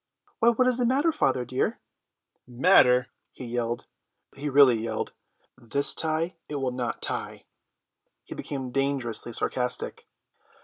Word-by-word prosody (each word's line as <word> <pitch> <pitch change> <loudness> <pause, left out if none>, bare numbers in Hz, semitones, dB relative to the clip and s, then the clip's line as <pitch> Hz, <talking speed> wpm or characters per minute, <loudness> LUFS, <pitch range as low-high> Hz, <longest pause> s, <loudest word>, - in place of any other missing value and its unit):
"Why, 230 - +5
what 250 +2 +2
is 255 -1 +2
the 245 - +2
matter, 285 +6 +3
father 130 - 0
dear?" 130 +2 -1 0.7
"Matter!" 125 -2 +4 0.2
he 130 - -8
yelled; 120 0 -3 0.5
he 145 +1 -4
really 135 -4 +6
yelled. 110 -1 -3 0.5
"This 140 +4 -1
tie, 160 +2 -1
it 150 - -4
will 135 -2 -1
not 125 -1 -4
tie." - - -4 0.8
He - - -8
became 130 -3 -5
dangerously 135 -4 -1
sarcastic. 125 +2 -1
130 Hz, 130 wpm, -26 LUFS, 125-155 Hz, 0.8 s, really